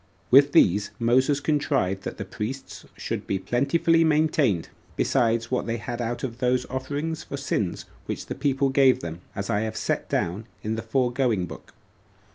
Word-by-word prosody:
With 140 Hz, +2 st, +7 dB
these 100 Hz, +2 st, +4 dB
Moses 130 Hz, +4 st, +3 dB
contrived 140 Hz, -11 st, 0 dB
that -, -, -5 dB
the 100 Hz, -, -5 dB
priests 115 Hz, +7 st, -6 dB
should -, -, -4 dB
be 100 Hz, -, 0 dB
plentifully 140 Hz, -, +2 dB
maintained, 150 Hz, -, +2 dB, 0.3 s
besides 115 Hz, -2 st, +1 dB
what 125 Hz, -, 0 dB
they 115 Hz, 0 st, -1 dB
had 120 Hz, +2 st, -5 dB
out 120 Hz, +1 st, -3 dB
of 120 Hz, -2 st, -4 dB
those 125 Hz, 0 st, +1 dB
offerings 145 Hz, +5 st, -3 dB
for 140 Hz, -, -5 dB
sins 105 Hz, -9 st, -2 dB, 0.2 s
which -, -, -4 dB
the -, -, -4 dB
people 135 Hz, -1 st, +1 dB
gave 135 Hz, -1 st, +4 dB
them, 85 Hz, +1 st, -6 dB
as 100 Hz, 0 st, -3 dB
I 100 Hz, -, +2 dB
have 110 Hz, 0 st, -3 dB
set -, -, 0 dB
it -, -, -24 dB
down 95 Hz, +7 st, -1 dB, 0.2 s
in 110 Hz, -, -1 dB
the 110 Hz, -, -3 dB
foregoing 120 Hz, -3 st, +1 dB
book. -, -, -11 dB
125 Hz, 175 wpm, -25 LUFS, 110-140 Hz, 0.3 s, With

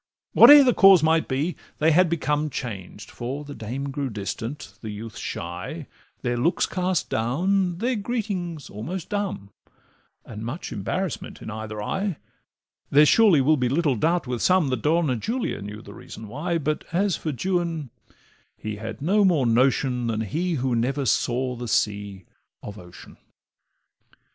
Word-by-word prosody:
Whate'er 285 Hz, +4 st, +10 dB
the 250 Hz, -2 st, +4 dB
cause 195 Hz, -6 st, +7 dB
might 160 Hz, 0 st, +3 dB
be, 145 Hz, +6 st, -1 dB, 0.2 s
they 160 Hz, +2 st, +3 dB
had 175 Hz, +2 st, +4 dB
become 150 Hz, -2 st, 0 dB
Changed; 105 Hz, -7 st, -7 dB
for 135 Hz, +5 st, -5 dB
the 145 Hz, -, -8 dB
dame 130 Hz, +4 st, -5 dB
grew 140 Hz, -1 st, -3 dB
distant, 110 Hz, +2 st, -5 dB
the 110 Hz, -, -6 dB
youth 105 Hz, +1 st, -7 dB
shy, 90 Hz, -, -6 dB, 0.4 s
Their 120 Hz, -1 st, 0 dB
looks 160 Hz, +10 st, +2 dB
cast 180 Hz, -2 st, -1 dB
down, 175 Hz, -, 0 dB
their 245 Hz, +6 st, 0 dB
greetings 200 Hz, -, -3 dB
almost 155 Hz, -, -6 dB
dumb, 200 Hz, -, -3 dB, 0.7 s
And 110 Hz, -2 st, -8 dB
much 130 Hz, +9 st, -5 dB
embarrassment 125 Hz, -, -4 dB
in -, -, -7 dB
either 110 Hz, -1 st, -6 dB
eye; 195 Hz, -, -2 dB, 0.7 s
There 150 Hz, +2 st, +6 dB
surely 195 Hz, -4 st, +5 dB
will 155 Hz, +3 st, +3 dB
be 125 Hz, -2 st, 0 dB
little 145 Hz, -1 st, +1 dB
doubt 165 Hz, +8 st, +1 dB
with 125 Hz, -2 st, -3 dB
some 180 Hz, -6 st, +3 dB
That 130 Hz, -4 st, -2 dB
Donna 155 Hz, -3 st, +2 dB
Julia 230 Hz, -, -3 dB
knew 105 Hz, +2 st, -8 dB
the 100 Hz, -, -11 dB
reason 110 Hz, +2 st, -10 dB
why, 160 Hz, -, -2 dB
But 155 Hz, -1 st, -2 dB
as 190 Hz, +2 st, +1 dB
for 155 Hz, -, -3 dB
Juan, 165 Hz, -3 st, -2 dB, 0.7 s
he 105 Hz, 0 st, -5 dB
had 115 Hz, +4 st, -7 dB
no 205 Hz, +6 st, +3 dB
more 170 Hz, -9 st, +3 dB
notion 125 Hz, +1 st, +2 dB
Than 110 Hz, -1 st, -1 dB
he 165 Hz, -, -2 dB
who 130 Hz, -3 st, 0 dB
never 135 Hz, +4 st, 0 dB
saw 125 Hz, +3 st, 0 dB
the 120 Hz, 0 st, -6 dB
sea 100 Hz, -3 st, -1 dB, 0.4 s
of 105 Hz, 0 st, -8 dB
ocean. 90 Hz, -1 st, -14 dB
140 Hz, 160 wpm, -24 LUFS, 115-175 Hz, 0.7 s, Whate'er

